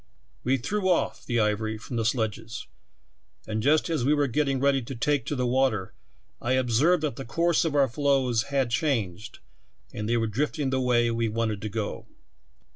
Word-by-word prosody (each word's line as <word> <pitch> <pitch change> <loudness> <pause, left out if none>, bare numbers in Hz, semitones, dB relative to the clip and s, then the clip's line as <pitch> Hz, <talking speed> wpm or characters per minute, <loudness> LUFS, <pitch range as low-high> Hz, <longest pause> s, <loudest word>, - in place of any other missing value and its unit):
"We 130 +2 +2
threw 190 - -1
off 180 - 0
the 120 -1 +1
ivory 110 0 0
from 115 +3 -8
the 115 -1 0
sledges, 115 -1 -2 0.8
and 110 0 -2
just 150 +5 +3
as 160 -7 -1
we 145 +4 +3
were 145 -1 +2
getting 135 +1 0
read}" 135 -3 +1
to 135 - -5
take 135 +1 0
to 145 - -1
the 125 -1 0
water 120 -6 +1 0.5
I 125 - 0
observed 130 +7 +3
that 145 -6 -2
the 135 - -5
course 170 +7 +1
of 155 -3 -1
our 140 -2 +4
floes 130 -3 +1
had 135 -4 0
changed 115 - -1 0.6
and 105 +1 -4
the}" 120 - +2
were 115 - +1
drifting 135 +5 -1
the 130 0 +1
way 120 -2 +2
we 115 -1 0
wanted 110 -2 -1
to 110 - -3
go. 105 0 -4
125 Hz, 190 wpm, -26 LUFS, 115-140 Hz, 0.8 s, our